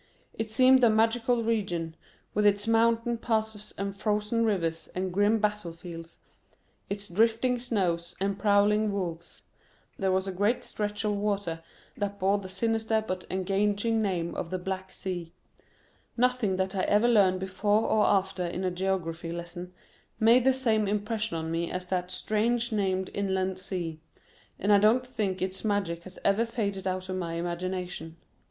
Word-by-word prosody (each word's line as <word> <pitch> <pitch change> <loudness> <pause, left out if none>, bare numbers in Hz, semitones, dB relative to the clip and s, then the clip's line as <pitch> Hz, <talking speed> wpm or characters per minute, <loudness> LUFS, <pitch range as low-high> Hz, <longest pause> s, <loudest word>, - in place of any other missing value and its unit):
It 225 0 -4
seemed 255 +3 +5
a 235 - +7
magical 230 +2 +2
region, 180 -8 -1 0.4
with 210 - +1
its 205 0 +3
mountain 230 +1 +2
passes 220 -2 -2
and 200 0 -3
frozen 210 +2 0
rivers 165 -6 -1
and 185 0 -2
grim 205 +3 +3
battlefields, 170 -5 -4 0.7
its 200 0 -3
drifting 230 +6 +2
snows, 180 -8 -1
and 195 +1 -1
prowling 210 0 +3
wolves; 175 -4 -5 0.6
there 190 -1 +1
was 190 +1 +1
a - - -1
great 205 +6 +1
stretch 210 0 -3
of 210 -1 +1
water 200 -5 -1 0.4
that 200 0 -3
bore 195 +2 +2
the 190 -1 -8
sinister 220 +2 0
but 185 0 -3
engaging 205 +4 +1
name 180 -5 -1
of 165 - -4
the 185 - -2
Black 190 +1 -4
Sea—nothing 190 +5 -4
that 190 +1 -1
I 190 - +1
ever 210 +3 +3
learned 195 -6 +4
before 205 +3 +1
or 215 - +3
after 190 -2 +1
in 175 +2 -4
a 185 - 0
geography 175 -3 -2
lesson 175 +1 -6 0.5
made 235 +3 +5
the 265 - +6
same 220 -5 +1
impression 210 -1 -1
on 160 0 -3
me 170 +1 -1
as 180 0 -4
that 180 -1 -2
strange 230 +5 0
named 190 -3 0
inland 190 -2 -1
sea, 175 -4 -4 0.6
and 205 +2 +3
I 200 - +7
don't 225 +5 +4
think 205 -7 -2
its 190 0 -4
magic 195 -6 -1
has 185 0 -10
ever 210 +4 +3
faded 200 -5 -2
out 185 0 -2
of 185 0 -3
my 170 -2 -3
imagination. 175 -1 -4
200 Hz, 160 wpm, -28 LUFS, 185-220 Hz, 0.7 s, a